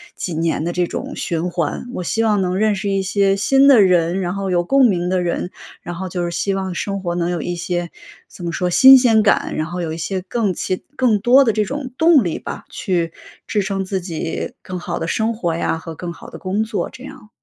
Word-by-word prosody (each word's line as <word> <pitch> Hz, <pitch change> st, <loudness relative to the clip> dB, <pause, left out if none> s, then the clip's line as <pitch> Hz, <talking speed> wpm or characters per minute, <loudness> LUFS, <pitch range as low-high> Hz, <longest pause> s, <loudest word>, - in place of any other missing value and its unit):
几 180 Hz, -, -4 dB
年 160 Hz, -1 st, -1 dB
的 175 Hz, -, -2 dB
这 180 Hz, 0 st, +1 dB
种 -, -, -6 dB
循 170 Hz, +1 st, -2 dB
环。 170 Hz, +2 st, -2 dB
我 180 Hz, -, -4 dB
希 225 Hz, +6 st, 0 dB
望 210 Hz, -3 st, +2 dB
能 180 Hz, 0 st, -1 dB
认 215 Hz, 0 st, +2 dB
识 200 Hz, +1 st, -3 dB
一 195 Hz, 0 st, +1 dB
些 195 Hz, +1 st, +2 dB
新 270 Hz, +6 st, +4 dB
的 245 Hz, -7 st, +7 dB
人， 180 Hz, -1 st, +3 dB
然 180 Hz, -1 st, -2 dB
后 195 Hz, -1 st, -2 dB
有 175 Hz, -1 st, +2 dB
共 270 Hz, +5 st, +4 dB
鸣 180 Hz, -6 st, +1 dB
的 185 Hz, 0 st, +1 dB
人， 175 Hz, +1 st, -2 dB, 0.3 s
然 175 Hz, -, -6 dB
后 185 Hz, +2 st, -5 dB
就 175 Hz, -1 st, -3 dB
是 -, -, -2 dB
希 195 Hz, +3 st, -1 dB
望 190 Hz, -2 st, -3 dB
生 195 Hz, +2 st, -3 dB
活 175 Hz, -2 st, -2 dB
能 175 Hz, 0 st, -1 dB
有 175 Hz, -2 st, -2 dB
一 175 Hz, +3 st, -3 dB
些 175 Hz, 0 st, -3 dB, 0.4 s
怎 180 Hz, -, -12 dB
么 170 Hz, -, -2 dB
说， 180 Hz, +1 st, -1 dB
新 265 Hz, +9 st, +9 dB
鲜 225 Hz, -4 st, +4 dB
感， 205 Hz, -, +2 dB
然 155 Hz, -, -1 dB
后 175 Hz, +3 st, -5 dB
有 165 Hz, -2 st, -3 dB
一 -, -, -5 dB
些 185 Hz, +3 st, -3 dB
更 200 Hz, +1 st, -1 dB
奇 185 Hz, +2 st, -3 dB
更 240 Hz, -5 st, +3 dB
多 255 Hz, +4 st, +6 dB
的 225 Hz, -, +2 dB
这 215 Hz, 0 st, +1 dB
种 275 Hz, +5 st, -5 dB
动 320 Hz, -, +5 dB
力 170 Hz, -, -2 dB
吧， -, -, -7 dB
去 170 Hz, -3 st, -2 dB, 0.3 s
支 210 Hz, -, 0 dB
撑 195 Hz, 0 st, -2 dB
自 190 Hz, 0 st, -2 dB
己 165 Hz, -2 st, -4 dB
更 185 Hz, -, -6 dB
好 175 Hz, -1 st, -4 dB
的 165 Hz, -, -3 dB
生 220 Hz, +6 st, 0 dB
活 175 Hz, -7 st, -2 dB
呀 165 Hz, -, -1 dB
和 165 Hz, 0 st, -8 dB
更 170 Hz, +2 st, -6 dB
好 -, -, -11 dB
的 -, -, -10 dB
工 195 Hz, +3 st, -2 dB
作， 220 Hz, -2 st, -3 dB
这 260 Hz, -, -11 dB
样。 215 Hz, -, -12 dB
185 Hz, 265 characters per minute, -19 LUFS, 175-210 Hz, 0.4 s, 新